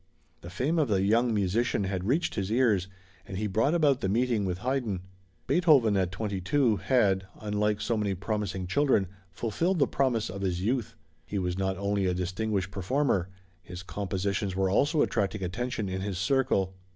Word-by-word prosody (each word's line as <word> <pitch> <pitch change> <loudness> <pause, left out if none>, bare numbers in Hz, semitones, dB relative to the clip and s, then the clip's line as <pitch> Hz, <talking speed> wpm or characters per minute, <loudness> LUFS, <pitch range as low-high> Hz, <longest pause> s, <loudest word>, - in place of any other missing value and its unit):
The 85 - -9
fame 135 - 0
of 150 - +2
the 100 -3 +1
young 115 +4 +3
musician 105 +2 +1
had 95 -1 -2
reached 150 +8 +1
his 100 -1 -2
ears, 110 -7 +2 0.4
and 95 - -7
he 105 - -2
brought 110 - +1
about 145 -5 +3
the 95 - 0
meeting 115 -1 +1
with 90 -1 -2
Haydn. 120 -4 -2 0.4
Beethoven 145 - +4
at 95 -2 +1
twenty 100 0 -3
two, 115 +2 +2
had, 95 -8 +2
unlike 105 0 0
so 110 +2 -1
many 100 -2 0
promising 100 -1 -3
children, 120 +1 +2 0.2
fulfilled 120 - -1
the 145 - +4
promise 130 -5 0
of 100 +2 -6
his 90 -3 -1
youth. 120 +1 -1 0.3
He 90 +6 -5
was 90 -2 -1
not 95 0 -1
only 100 -1 0
a 90 - 0
distinguished 95 +1 -2
performer: 100 -1 0 0.3
his 90 -1 -9
compositions 100 0 -2
were 95 0 +1
also 145 - +3
attracting 100 0 -1
attention 110 +4 -3
in 95 0 -3
his 100 -2 -3
circle. 100 -3 +1
100 Hz, 175 wpm, -28 LUFS, 95-120 Hz, 0.4 s, Beethoven